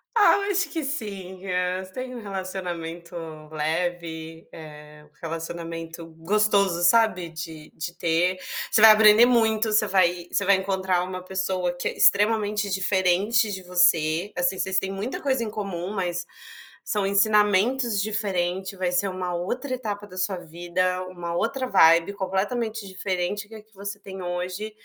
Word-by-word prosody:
Ah, 425 -3 +6
eu 405 0 -1
acho 385 -4 0
que 320 -1 -3
sim. 200 -9 -5
Eh, 180 0 -1
"Você 185 - -17
tem 255 0 -6
um 245 - -6
relacionamento 180 -4 -6 0.4
leve, 160 +1 -3
eh, 150 -1 -12
um - - -38
relacionamento 165 0 -6
gostoso, 190 +2 +1
sabe, 185 -2 +3
de 160 -1 -8
de 165 +2 -6
ter, 175 +3 +1 0.3
você 215 - +3
vai 220 0 +11
aprender 215 +1 +7
muito, 225 -2 +2
você 215 0 +3
vai 180 -2 +2
você 200 - 0
vai 200 0 +4
encontrar 190 -2 0
uma 185 0 -6
pessoa 185 -1 -1
que 175 - -4
é - - -3
extremamente 210 0 +3
diferente 190 +3 +2
de 190 -1 -6
você, 175 0 +2
assim, 180 +2 +1
vocês 190 0 -1
têm 195 0 -4
muita 200 +6 -4
coisa 265 -4 0
em 215 - -4
comum, 195 -3 -4
mas 175 -3 -2 0.6
são 205 -2 0
ensinamentos 210 +3 +3
diferente, 195 -2 -2
vai 185 -1 -1
ser 180 +3 +1
uma 185 -1 -4
outra 250 +10 -3
etapa 210 -5 -4
da 185 -2 -11
sua 185 +1 -1
vida, 175 +2 -2
uma 175 -2 -6
outra 255 +8 -1
vibe 165 -4 +5
completamente 205 +3 -2
diferente 190 +2 -3
que 225 - -12
a 215 - -10
que 220 0 -34
você 200 +1 -6
tem 195 -1 -9
hoje, 180 +4 -4
190 Hz, 160 wpm, -25 LUFS, 175-210 Hz, 0.6 s, vai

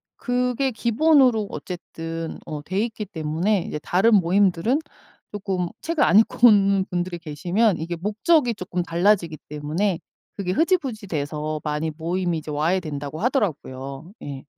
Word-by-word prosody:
그게 250 +1 0
기본으로 240 -1 +3
어쨌든 165 -2 -6
어 150 -1 -5
돼있기 210 +5 -2
때문에 175 +3 0
이제 - - -4
다른 210 +5 +4
모임들은 195 - +3 0.5
쪼끔 190 -3 -2
책을 325 -3 +1
안 - - +5
읽고 230 +2 +5
오는 200 -3 +4
분들이 175 -1 -2
계시면 175 +6 +1
이게 170 +2 -4
목적이 230 - +2
쪼끔 180 -2 -3
달라지기 170 -1 +1
때문에 160 +5 -1 0.4
그게 190 -3 -2
흐지부지 275 - 0
돼서 155 -1 -3
많이 150 +1 -2
모임이 170 +1 -1
이제 155 - -10
와해 160 +6 +1
된다고 150 -2 -6
하더라구요 155 - -2
예. 140 -2 -7
180 Hz, 325 characters per minute, -23 LUFS, 160-215 Hz, 0.5 s, 안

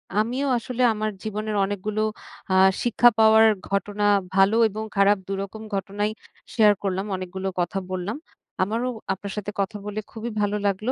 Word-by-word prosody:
আমিও 245 +7 0
আসলে 250 +1 -4
আমার 215 0 -2
জীবনের 215 0 -3
অনেকগুলো 205 +2 -3 0.5
আ - - +3 0.3
শিক্ষা 240 0 +5
পাওয়ার 220 0 +7 0.2
ঘটনা, 205 +1 -2 0.3
ভালো 195 +3 +4
এবং 215 +2 -5
খারাপ, 200 +1 +4
দুরকম 195 +2 -5
ঘটনাই 205 +2 -2 0.4
শেয়ার 210 -3 +6
করলাম। 190 +1 -1
অনেকগুলো 185 +1 -5
কথা 175 +3 -1
বললাম। 185 +6 -3 0.5
আমারও 225 +6 -1 0.3
আপনার 195 +1 -7
সাথে 205 0 -4
কথা 205 +2 -1
বলে 210 +1 -4
খুবই 225 +1 -5
ভালো 205 0 0
লাগলো। 200 +5 0
205 Hz, 150 wpm, -24 LUFS, 195-220 Hz, 0.5 s, পাওয়ার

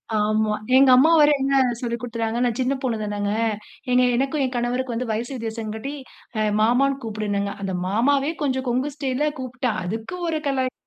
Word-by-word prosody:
ஆமா, 215 0 +1 0.2
எங்க 270 -1 +6
அம்மா 305 +6 +6
வேற 295 0 +6
என்ன 275 0 +3 0.2
சொல்லிக் 235 -1 -3
கொடுத்துகிறாங்க, 230 -1 -2
நான் 235 -2 -1
சின்ன 260 +2 +1
பொண்ணு 240 -4 -1
தானங்க. 205 -1 -2 0.6
எங்க 250 0 +5
எனக்கும் 275 +3 0
என் 255 - -4
கணவருக்கும் 245 0 -1
வயசு 235 +5 -3
வித்தியாசம் 225 -2 -4
காட்டி 275 +6 -5 0.5
அ 215 - +2 0.2
மாமான்னு 270 +5 +2
கூப்பிடுனாங்க, 205 -2 -2
அந்த 190 -1 -2
மாமாவே 275 +8 +2
கொஞ்சம், 260 -2 -1
கொங்கு 260 +4 0
ஸ்டைல்ல 280 +1 0
கூப்பிட்டா, 255 -2 -2
அதுக்கு 225 - -4
ஒரு 315 - -1
கலாய்ப் 260 -1 -1
245 Hz, 165 wpm, -23 LUFS, 220-270 Hz, 0.6 s, எங்க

